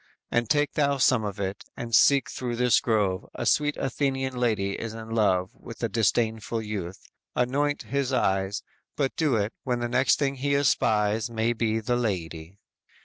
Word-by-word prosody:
And 120 -1 +1
take 145 -1 +2
thou 140 -2 +1
some 130 -3 +3
of 100 -1 -4
it, 95 +1 -3
and 115 -1 -6
seek 140 +4 +5
through 125 -2 -3
this 125 0 +4
grove; 105 -5 0
A - - -4
sweet 145 -1 +2
Athenian 135 -1 -1
lady 110 -5 0
is 110 +2 -5
in 115 0 -8
love 100 -4 +2
With 115 -2 -11
a 115 - +1
disdainful 110 +1 0
youth; 95 -4 -6 0.3
anoint 145 +4 0
his 140 -1 -1
eyes; 95 -5 0 0.3
But 135 -2 -1
do 150 -6 +1
it, 105 +1 -1
when 125 -3 -1
the 120 - -1
next 125 -1 +3
thing 140 -2 -1
he 140 +2 0
espies 110 -5 +2
May 115 +1 0
be 110 -1 0
the 120 +2 0
lady." 90 -6 -3
115 Hz, 175 wpm, -26 LUFS, 105-130 Hz, 0.3 s, seek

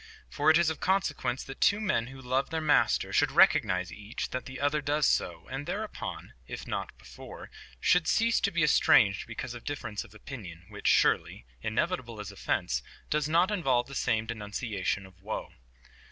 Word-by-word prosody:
For 150 +1 +2
it 160 - +7
is 170 -2 +3
of 160 - -6
consequence 155 -9 0
that 135 - -10
two 205 - +4
men 190 - 0
who 135 +1 -10
love 130 +1 -1
their 160 +1 -1
Master 155 -2 +2
should - - +3
recognize 90 -2 +4
each 105 +6 -6
that 130 - -4
the 130 0 -8
other 145 +1 +1
does 145 +1 +1
so, 85 -2 0
and 135 +2 -5
thereupon, 215 +1 -5
if - - -7
not - - -4
before, - - -11 0.3
should - - +3
cease 230 0 +3
to 205 - +1
be 170 -4 0
estranged 105 -9 +4
because 120 +2 -5
of 120 - -9
difference 120 -8 -4
of - - -17
opinion, 95 - -9
which - - -5
surely, - - +2 0.2
inevitable 120 - -2
as 105 -1 -6
offence, 65 -9 -1 0.3
does 150 0 +1
not 175 +5 +3
involve 135 -11 +1
the 140 - -11
same 110 -4 0
denunciation 105 -3 -3
of 95 -1 -18
woe. 110 +3 -5
130 Hz, 180 wpm, -29 LUFS, 105-155 Hz, 0.3 s, it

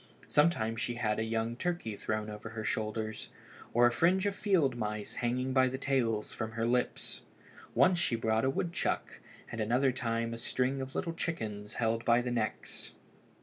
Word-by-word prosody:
Sometimes 115 -8 +2
she 120 0 -1
had 110 -3 0
a - - +1
young 115 +1 -1
turkey 170 -7 -2
thrown 110 +1 -2
over 105 +1 -7
her 110 0 -5
shoulders, 110 0 -2 0.4
or 120 +1 +5
a 120 - +5
fringe 180 +9 +3
of 200 - +1
field 185 - +2
mice 105 -2 -3
hanging 125 +2 0
by 130 -1 +5
the 130 +1 -2
tails 120 -6 0
from 110 -1 -4
her 115 0 -1
lips. 125 +1 0 0.5
Once 180 -1 +5
she 125 - +2
brought 110 -1 +1
a 130 - +3
wood 170 +5 -1
chuck, - - -1 0.3
and 115 - -3
at - - +1
another 130 +3 +3
time 115 -2 -1
a 115 - -5
string 130 +3 0
of 130 +1 -6
little 170 - -1
chickens 110 -11 -3
held 115 0 0
by 120 0 +5
the 125 0 -2
necks. 110 -3 -2
120 Hz, 190 wpm, -32 LUFS, 110-130 Hz, 0.5 s, or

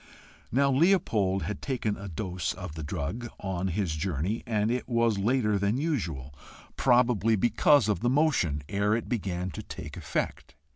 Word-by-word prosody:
Now 140 +3 +3
Leopold 130 - +2
had 105 -1 -4
taken 120 -6 -1
a 100 - -8
dose 90 +1 -3
of 90 -4 -7
the 80 - -6
drug 85 +11 -4
on 95 -1 -2
his 95 -2 -1
journey, 90 +5 -2
and 110 -1 +1
it 125 +1 -2
was 115 -3 +2
later 105 -1 +2
than 100 +4 +1
usual, 85 - -2 0.4
probably 120 -4 +3
because 120 +4 +4
of 105 - +1
the 120 - +1
motion, 125 - +2
ere 100 +5 +1
it 115 - -3
began 95 -6 -2
to - - -6
take - - -8
effect. - - -3
105 Hz, 160 wpm, -28 LUFS, 90-120 Hz, 0.4 s, because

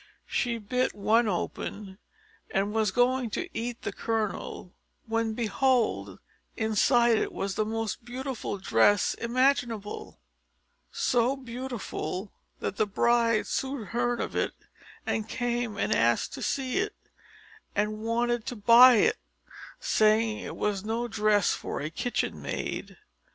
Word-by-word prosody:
She 235 -2 -1
bit 250 +4 -1
one 225 +3 +3
open, 195 +1 -4 0.5
and 200 +2 0
was 220 -2 +2
going 245 +3 +2
to - - -5
eat 235 +1 -4
the - - -2
kernel, 215 -5 -3 0.3
when, 225 -1 -1
behold, 220 - +1 0.4
inside 225 +1 +3
it - - -2
was 195 0 -3
the 215 - 0
most 225 0 -3
beautiful 250 -3 -4
dress 195 - +3
imaginable 240 -3 -1 0.7
so 245 +3 +1
beautiful 240 -6 -5 0.3
that 195 - -3
the 215 - +2
bride 230 0 +2
soon 265 -1 -2
heard 240 +2 -1
of - - -3
it, - - 0 0.7
came 240 -2 -2
and - - +1
asked 115 0 +2
to - - -7
see 265 +2 -1
it, 425 +2 -2 0.8
and 210 +1 0
wanted 235 +1 0
to 245 - -3
buy 235 +4 +8
it, 215 - +3 0.6
saying 215 0 +2
it - - -6
was 205 -2 -1
no 230 +3 -2
dress 210 -3 +2
for - - -4
a 155 +2 -4
kitchen 245 +7 -2
maid. - - -4
225 Hz, 130 wpm, -28 LUFS, 210-245 Hz, 0.8 s, buy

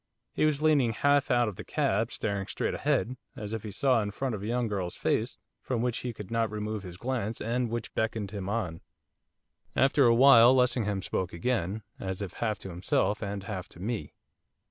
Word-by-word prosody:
He - - +2
was 150 -1 +1
leaning 140 -7 +4
half 145 +5 +3
out 120 -2 +3
of 105 - -5
the - - -6
cab, 110 +4 0
staring 100 -2 -2
straight - - -2
ahead, 125 +2 0 0.2
as 110 -4 -6
if 110 - -3
he 110 - -6
saw 125 +4 +2
in 105 - -2
front 130 +5 -3
a 100 -2 -4
young 120 +2 0
girl's 95 -4 -3
face, - - 0 0.2
from 120 -3 -1
which 125 -2 0
he 125 - -3
could 105 -3 -9
not 115 -1 +1
remove 105 0 -3
his 90 -2 -9
glance, 115 -1 -2
and 120 +2 -1
which 115 -1 -4
beckoned 110 -3 -1
him 100 -2 -4
on. 90 -7 -2 0.9
After 135 +1 +4
a 115 -1 +6
while 125 -1 +8
Lessingham 115 -6 +1
spoke 90 0 -2
again, 105 +1 -1 0.2
as 95 -1 -4
if 95 - -6
half 110 -2 -1
to - - -5
himself 95 +3 0
and 100 -2 -4
half 95 -2 -5
to - - -15
me. 110 +3 -4
110 Hz, 200 wpm, -29 LUFS, 100-125 Hz, 0.9 s, while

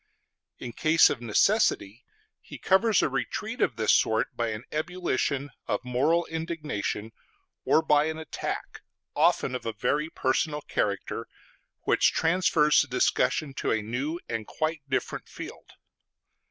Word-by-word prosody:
In 120 - -7
case 155 +6 +5
of 125 - -4
necessity 120 - +2 0.4
he - - -11
covers 205 +2 +3
a - - +3
retreat 215 - -3
of 125 - +2
this 110 -1 +3
sort 110 0 +2
by 120 - -1
an 110 +1 -4
ebullition 150 -4 -2 0.2
of - - -2
moral 145 +8 +2
indignation, 155 - -4 0.5
or 160 - +4
by 150 -1 +4
an 160 0 -3
attack, 160 -2 -5 0.3
often - - +2
of 125 - -4
a 115 - -2
very 145 +8 0
personal 150 +2 0
character, 100 -7 -2 0.5
which - - +3
transfers 165 -3 +3
the - - -3
discussion 135 +3 +1
to - - -3
a 110 -1 0
new 135 +10 -3
and 115 -2 -4
quite 155 0 -2
different 130 - -2
field. - - -9
145 Hz, 140 wpm, -27 LUFS, 120-160 Hz, 0.5 s, case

